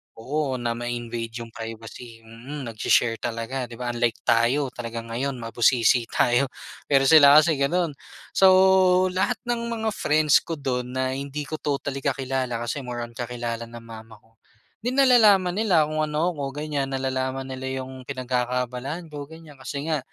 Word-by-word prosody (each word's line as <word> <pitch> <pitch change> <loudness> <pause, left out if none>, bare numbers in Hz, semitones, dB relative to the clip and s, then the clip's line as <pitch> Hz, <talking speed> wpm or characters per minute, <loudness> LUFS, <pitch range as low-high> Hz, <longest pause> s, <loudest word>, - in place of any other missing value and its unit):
oo, 135 +3 -2
na 120 -2 -2
ma-invade 120 -1 -4
yung 115 - -12
privacy, 115 +1 -9
mm, 120 +6 -9
nag-she-share 115 +1 +2
talaga 120 +2 -4
'di 120 - -10
ba, 120 +1 -3
unlike 120 -1 0
tayo 125 +4 +2
talagang 115 -1 -7
ngayon 135 +4 -2
mabusisi 120 0 +2
tayo 120 +4 +2 0.4
pero 135 -2 +4
sila 145 0 +8
kasi 155 -1 +5
gano'n. 165 +4 +1 0.4
So 190 - +5 0.6
lahat 190 +7 0
ng 240 -1 -2
mga 225 -1 -2
friends 155 -5 +3
ko 165 - -5
do'n 130 -4 -3
na 130 0 0
hindi 140 +2 -4
ko 155 +2 -6
totally 140 -1 -2
kakilala, 130 -3 -2
kasi 120 +4 -3
more 125 -2 -5
on 120 - -8
kakilala 120 -1 -5
ng 115 0 -11
mama 110 -1 -11
ko, 110 +1 -27 0.4
'di 245 +3 -3
nalalaman 220 -9 +5
nila 185 -5 +3
kung 155 +1 -3
ano 155 +3 0
ako, 145 -1 -5
ganyan 140 -3 -2
nalalaman 130 0 -2
nila 130 0 -4
yung 130 -1 -11
pinagkakaabalahan 125 +4 -3
ko 145 -1 -7
ganyan, 160 -3 -14
kasi 140 +1 -5
nga 155 - +1
130 Hz, 160 wpm, -24 LUFS, 120-150 Hz, 0.6 s, sila